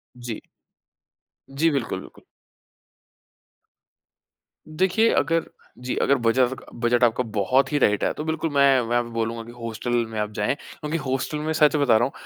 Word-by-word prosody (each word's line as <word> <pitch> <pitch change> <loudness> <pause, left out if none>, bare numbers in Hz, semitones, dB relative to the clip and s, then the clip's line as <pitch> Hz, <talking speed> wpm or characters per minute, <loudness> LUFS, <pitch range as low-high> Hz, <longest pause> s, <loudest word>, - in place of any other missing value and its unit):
जी। 120 -2 -6 1.1
जी, 145 +5 +1
बिल्कुल, 135 -5 -2
बिल्कुल। - - -11 2.7
देखिए, 195 +5 +4
अगर 165 +2 +1 0.3
जी, 125 0 -3
अगर 140 - +3
बचा 120 +2 +3
सका 130 - -8 0.2
बजट 120 0 +2
आपका 120 +1 +3
बहुत 130 +7 +2
ही 145 - +1
टाइट 105 -5 +2
है, - - +2
तो 150 - -5
बिल्कुल 160 0 -1
मैं 140 - +3 0.2
मैं 115 - -5
वहाँ 120 0 +2
पे 120 - -9
बोलूँगा 115 0 -2
कि 120 - -11
हॉस्टल 115 +1 -4 0.2
में 110 -1 -4
आप 105 0 -2
जाएँ 105 +6 0
क्योंकि 150 +2 -6
हॉस्टल 135 0 -2
में 155 +1 -2
सच 155 -1 +4
बता 140 -7 +4
रहा 115 - +1
हूँ, 135 - -4
130 Hz, 170 wpm, -24 LUFS, 115-150 Hz, 2.7 s, देखिए